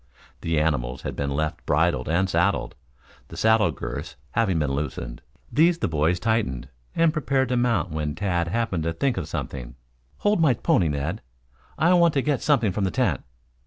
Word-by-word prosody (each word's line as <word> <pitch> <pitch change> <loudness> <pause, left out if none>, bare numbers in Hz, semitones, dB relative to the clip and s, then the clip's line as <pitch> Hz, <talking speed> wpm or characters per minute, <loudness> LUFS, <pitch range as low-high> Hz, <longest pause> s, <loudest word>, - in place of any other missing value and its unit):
The 80 -2 0
animals 65 -5 -1
had - - -4
been 70 -1 -2
left 75 +2 -2
bridled 75 -4 +1
and 90 +4 +2
saddled, 90 +3 +1 0.5
the - - -10
saddle 110 -1 +4
girths - - -6 0.2
having 95 -3 +1
been 75 -3 0
loosened. 70 -4 -4 0.3
These 165 +3 +4
the 165 - -1
boys 80 +2 +1
tightened 100 - -1 0.3
and 165 -1 +3
prepared 135 -5 0
to 125 - +1
mount 115 -9 +1
when 75 -1 -2
Tad 90 -3 0
happened 100 -2 -1
to 85 - 0
think 130 +8 0
of - - -3
something. 60 -3 -5 0.4
"Hold 205 -4 +2
my 140 -7 +4
pony, 90 -5 +2
Ned. 75 +7 -2 0.6
I 170 +3 +4
want 170 -3 +4
to 135 - +2
get 145 -3 0
something 120 -9 +2
from 100 +2 -2
the - - +1
tent." 105 - 0
90 Hz, 180 wpm, -24 LUFS, 75-125 Hz, 0.6 s, saddle